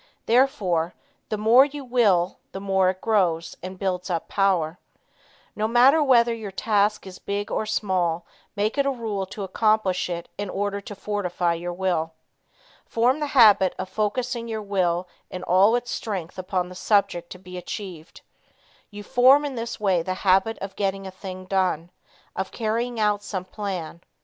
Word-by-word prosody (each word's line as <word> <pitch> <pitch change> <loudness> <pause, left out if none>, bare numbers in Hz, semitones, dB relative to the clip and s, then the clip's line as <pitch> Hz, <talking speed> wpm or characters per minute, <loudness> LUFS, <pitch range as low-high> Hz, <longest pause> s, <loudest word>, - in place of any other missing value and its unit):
Therefore 195 -9 +2 0.3
the 215 - -1
more 225 +5 +6
you 285 -1 -5
will, 205 -8 +2
the 195 - -5
more 190 -1 +2
it 185 0 -4
grows, 175 -7 +1
and 185 +1 -7
builds 185 -1 -2
up 170 -2 -2
power. 180 -4 +1 0.8
No 215 0 0
matter 255 +7 +5
whether 240 -4 +4
your 220 -3 -6
task 210 +1 +1
is 185 -1 -10
big 205 +1 -4
or 215 - -1
small, 180 -6 0 0.3
make 210 +6 -1
it 280 - +2
a - - +3
rule 220 -7 -3
to 200 +1 -6
accomplish 195 -1 +1
it 170 -1 -4
in 205 -1 -3
order 200 +1 -2
to 205 - -9
fortify 180 -4 -1
your 175 +1 -4
will. 175 -3 -1 0.7
Form 245 +5 +1
the 300 - -1
habit 205 -5 +6
of 185 - -5
focusing 235 +4 -2
your 220 -2 -4
will 180 -3 0 0.2
in 185 - -6
all 195 +6 +4
its 245 0 -2
strength 190 -5 -4
upon 185 -1 -2
the - - -9
subject 195 -3 +1
to - - -9
be 180 0 -11
achieved. 180 -2 -7 0.7
You 205 -1 -9
form 260 +6 +5
in 285 - -3
this 235 -1 -5
way 190 -5 +2
the 185 +2 -3
habit 195 +4 +3
of 195 0 -6
getting 195 -1 -2
a 190 - -6
thing 185 -1 -8
done, 185 -3 0 0.4
of 190 - -3
carrying 235 +1 -2
out 210 -1 +2
some 195 -3 -5
plan. 185 -5 -5
200 Hz, 170 wpm, -24 LUFS, 185-220 Hz, 0.8 s, more